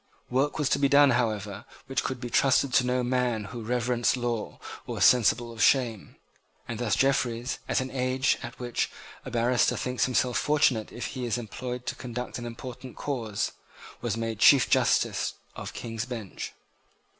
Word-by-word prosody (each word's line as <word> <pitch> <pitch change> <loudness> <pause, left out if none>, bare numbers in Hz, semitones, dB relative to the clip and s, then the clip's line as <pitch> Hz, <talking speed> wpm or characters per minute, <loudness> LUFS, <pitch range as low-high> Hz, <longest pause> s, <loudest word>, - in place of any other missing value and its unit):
Work 135 +4 +1
was 150 -3 +1
to - - +2
be 140 -1 +3
done, 140 -1 +6
however, 105 -4 -1 0.2
which 135 - -1
could 130 -2 -3
be 120 -1 -6
trusted 135 -1 +3
to 125 - +5
no 125 0 0
man 125 -3 0
who 105 +4 -7
reverenced 120 +2 +1
law 120 -3 -3 0.3
or - - -4
was - - +3
sensible 120 -1 +4
of 115 - -6
shame; 120 -7 +2 0.5
and 115 -2 -5
thus 115 -5 +1
Jeffreys, 125 -2 +1
at - - +2
an 130 0 -5
age 130 +1 +1
at - - -8
which 120 -1 -2 0.4
a - - -5
barrister 120 +1 +2
thinks 125 0 0
himself 125 0 +1
fortunate 140 -7 +2
if 120 - -5
he 130 -2 -4
is 115 0 0
employed 125 +2 -5
to - - -2
conduct 125 0 -5
an 120 - -5
important 125 +2 -8
cause, 115 -8 -2 0.5
was 115 -2 -2
made 115 -2 -3
Chief 135 +2 +7
Justice - - +2 0.2
of - - -6
the - - -11
King's 115 -1 -4
Bench. 115 -7 -6
125 Hz, 180 wpm, -27 LUFS, 115-130 Hz, 0.5 s, Chief